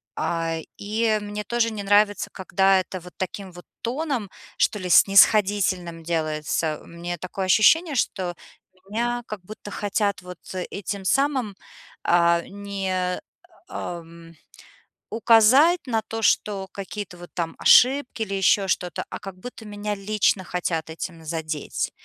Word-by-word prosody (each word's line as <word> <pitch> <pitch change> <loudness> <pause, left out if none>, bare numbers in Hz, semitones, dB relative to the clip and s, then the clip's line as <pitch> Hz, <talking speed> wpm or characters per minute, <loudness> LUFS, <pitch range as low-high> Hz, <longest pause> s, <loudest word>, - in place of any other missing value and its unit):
А, 165 -1 -1 0.2
и 215 +1 0
мне 210 0 -5
тоже 230 +1 0
не 215 -2 -5
нравится, 205 +1 +3
когда 190 0 +2
это 185 0 -5
вот 180 +1 -13
таким 190 +1 -5
вот 175 0 -13 0.2
тоном, 255 -3 -2 0.3
что - - +2
ли, 185 -3 -5
снисходительным 195 -3 +4
делается. 155 -1 -1
У - - -17
меня 175 +1 -5
такое 185 +3 -4
ощущение, 290 - +4
что 185 -7 -1 0.5
меня 240 +3 -1
как 215 -2 -6
будто 205 +2 -10
хотят 205 0 -1
вот 180 -1 -10 0.3
этим 200 0 -5
самым, 260 -2 +1 0.5
э, 170 0 +4
не, 195 -2 -3 0.5
эм, 165 -1 -8 0.8
указать 240 +10 +5
на 225 -3 0
то, 225 +1 -5
что 205 -2 +1
какие-то 200 -2 -7
вот 175 0 -11
там 165 -2 -3
ошибки 255 -1 +5
или 205 -3 -2
ещё 195 +1 +3
что-то, 180 -2 -1
а - - -6
как 195 -1 -8
будто 230 +3 -10
меня 210 0 -4
лично 200 -1 +1
хотят 170 -3 -2
этим 165 0 -7
задеть. 155 -2 -3
195 Hz, 135 wpm, -24 LUFS, 175-215 Hz, 0.8 s, указать